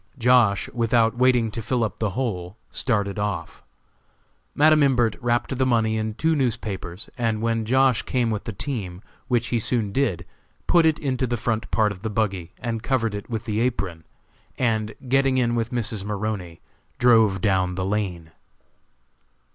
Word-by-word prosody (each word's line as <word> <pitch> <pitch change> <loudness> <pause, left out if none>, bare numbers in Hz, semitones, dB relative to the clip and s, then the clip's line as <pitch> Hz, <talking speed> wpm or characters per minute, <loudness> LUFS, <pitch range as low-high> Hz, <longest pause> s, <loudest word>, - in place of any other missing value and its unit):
Josh., 120 -6 +4
without 115 -1 +2
waiting 125 -3 +3
to 115 - -4
fill 120 +2 0
up 110 - -3
the 110 - 0
hole, 100 -6 -3
started 105 -4 0
off. 100 -5 -3 0.9
Madam 155 +1 +5
Imbert 120 -6 +3
wrapped 120 +2 0
the 130 - +1
money 115 -3 +2
in 110 -1 -2
two 160 +5 +1
newspapers, 110 - -3
and 115 -2 0
when 115 0 0
Josh. 130 +1 +3
came 120 -3 0
with 105 -1 -3
the 115 - -3
team, 100 -5 -5 0.2
which 120 -2 0
he 120 - +1
soon 110 -2 -1
did, 100 -10 0 0.4
put 170 -2 +4
it 160 -1 +2
into 130 -4 -1
the 120 0 -1
front 110 0 -2
part 110 -2 +2
of 90 -2 -9
the 110 - -3
buggy 100 -5 -2
and 115 -2 -3
covered 115 -3 0
it 100 +3 -6
with 110 -3 -4
the 110 -2 -1
apron, 100 -9 -2 0.5
and, 110 -3 0
getting 135 0 +3
in 120 -2 +2
with 115 -1 -1
Mrs. 115 -4 -3
Maroney, 100 -4 -4 0.4
drove 110 -5 +4
down 95 -2 +1
the 95 0 -2
lane. 95 -5 -3
115 Hz, 165 wpm, -24 LUFS, 105-125 Hz, 0.9 s, Madam